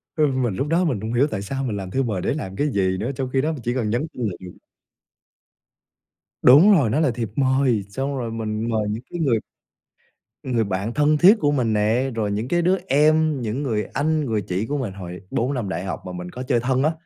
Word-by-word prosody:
Ờ, 155 -2 +3
mình 130 -7 -1
lúc 140 - -2
đó 170 +3 +2
mình 125 -11 -1
hổng 110 +2 -4
hiểu 135 +5 +3
tại 100 - -3
sao 135 +7 -4
mình 110 -6 -2
làm 95 -1 -6
thư 135 - +1
mời 105 -6 -2
để - - 0
làm 95 -11 -5
cái 145 - 0
gì 95 -2 +1
nữa? 115 +8 -2
Trong 130 0 -3
khi 135 - +3
đó 155 - 0
mình 150 -5 -6
chỉ 120 - -1
cần 115 -5 -1
nhắn 120 +8 -1
tin 125 - -5
là - - -5
được. 90 -1 -9 1.9
Đúng 150 +12 +7
rồi, 145 - +4
nó 140 +8 +1
là 150 -5 +2
thiệp 115 -2 -4
mời, 130 -5 +2
xong 135 +6 -3
rồi 115 -3 -3
mình 110 0 -3
mời 110 -2 0
những 110 +2 -3
cái 175 - -5
người 130 -8 +2 1.0
người 120 -4 0
bạn 100 +3 -3
thân 150 +2 +3
thiết 195 +8 +7
của 145 -6 +2
mình 120 -6 +1
nè, 110 +6 +1
rồi 105 -3 -1
những 105 +4 -2
cái 175 +5 +1
đứa 185 +3 +3
em, 155 0 +3
những 120 +6 -3
người 110 -5 -1
anh, 155 +1 0
người 110 -4 -1
chị 90 +3 -2
của 145 +4 -2
mình 115 -8 -3
hồi 90 -2 -8
4 125 +4 0
năm 120 -7 -3
đại 90 -1 -3
học 95 - -4
mà 90 - -6
mình 90 0 -6
có 125 - -6
chơi 125 -2 +1
thân 130 +2 0
á, 155 - +3
125 Hz, 250 wpm, -22 LUFS, 105-145 Hz, 1.9 s, Đúng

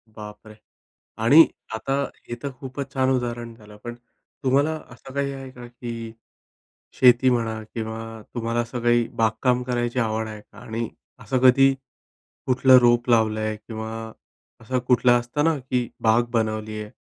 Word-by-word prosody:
बापरे! 105 0 -10 0.7
आणि 145 +9 +8 0.3
आता 125 +5 -3 0.4
हे 120 - -3
तर 140 - -3
खूपच 135 0 -7
छान 130 -1 +1
उदाहरण 120 -2 -2
झालं. 105 -2 -15
पण 120 0 -6 0.5
तुम्हाला 140 +4 +2 0.2
असं 135 - -13
काही 140 0 -1
आहे 135 -1 -8
का 125 -1 -11
की 115 -2 -7 0.8
शेती 125 0 +5
म्हणा 115 -2 -1
किंवा 110 -1 -4 0.3
तुम्हाला 115 0 -1
असं 120 +1 -4
काही 120 0 +3
बागकाम 125 +3 +1
करायची 120 0 -2
आवड 110 -1 -1
आहे 105 -1 -8
का? - - -20
आणि 115 0 -4 0.3
असं 130 - -1
कधी 135 +1 +6 0.7
कुठलं 130 0 +6
रोप 120 0 +3
लावलं 110 -2 +3
आहे 110 0 -2
किंवा 110 +1 -7 0.7
असं 125 +3 -1
कुठलं 125 0 +4
असतं 120 +5 -2
ना 165 -1 +2
की 125 -2 -2 0.2
बाग 115 +1 +4
बनवली 110 -1 -1
आहे, 105 - -9
120 Hz, 150 wpm, -23 LUFS, 110-130 Hz, 0.8 s, आणि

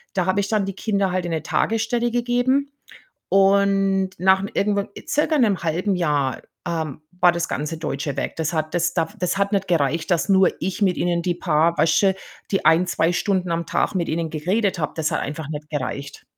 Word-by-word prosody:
da 185 -2 +1
habe 185 +2 +2
ich 200 - -3
dann 215 -3 +1
die 195 - -4
Kinder 200 -3 0
halt 185 -1 -1
in 175 - -3
'ne 160 -2 -2
Tagesstelle 225 +6 0
gegeben. 245 +4 +1 0.6
Und 195 -1 +3
nach 190 +2 +4
'ne 200 - -4
irgendwann 200 0 0
äh, - - -10
circa 300 +1 +1
'nem, 210 -8 +2
1/2 175 +5 0
Jahr, 145 -6 0 0.3
ähm, 160 -4 -3 0.2
war 175 - +6
das 170 -1 -2
ganze 150 +2 -3
Deutsche 145 -2 -3
weg. - - -3
Das 160 0 -1
hat 155 +1 -2
das 175 -1 +1
da 165 -2 +1
das 180 +2 -1
hat 200 +1 0
nicht 195 -2 +1
gereicht, 160 +1 0
dass 175 +2 +1
nur 190 -1 +5
ich 190 +2 -3
mit 185 -3 +3
ihnen 175 -1 0
die 175 0 0
paar, 170 -1 +1
weißt 160 +4 +3
du, 195 -1 +4 0.4
die 195 - 0
1, 170 +3 +5
2 165 -1 +1
Stunden 185 -1 0
am 170 0 -1
Tag - - 0
mit 175 -3 -1
ihnen 165 0 -1
geredet 190 +6 0
habe. 150 -2 -2
Das 155 -1 0
hat - - 0
einfach 150 +1 -5
nicht 150 0 -6
gereicht. 140 -1 -5
180 Hz, 215 wpm, -22 LUFS, 160-200 Hz, 0.6 s, war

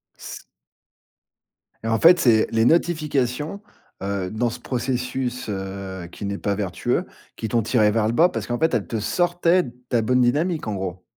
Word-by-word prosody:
S - - -9 1.4
Et - - -3
en 115 0 +1
fait 170 +1 +7
c'est 115 -7 +4
les 115 0 +2
notifications, 150 0 0 0.4
heu, 100 -2 -2
dans 115 +2 0
ce - - -7
processus, 125 0 -3
heu, 95 -2 -5
qui 100 - -7
n'est 100 0 -3
pas 100 -1 -1
vertueux, 95 -4 -1 0.3
qui 110 - -4
t'ont 115 - +2
tiré 110 -1 +3
vers 110 0 +1
le 115 - 0
bas 170 +7 +5
parce 115 - -5
qu'en 120 0 -2
fait 160 -2 +2
elles 115 -5 0
te 115 - -2
sortaient 175 - +2
de 120 - -9 0.2
ta 120 -2 +2
bonne 125 +3 +2
dynamique 150 +5 +1
en 105 - -2
gros? 95 -1 -5
120 Hz, 185 wpm, -23 LUFS, 105-145 Hz, 1.4 s, fait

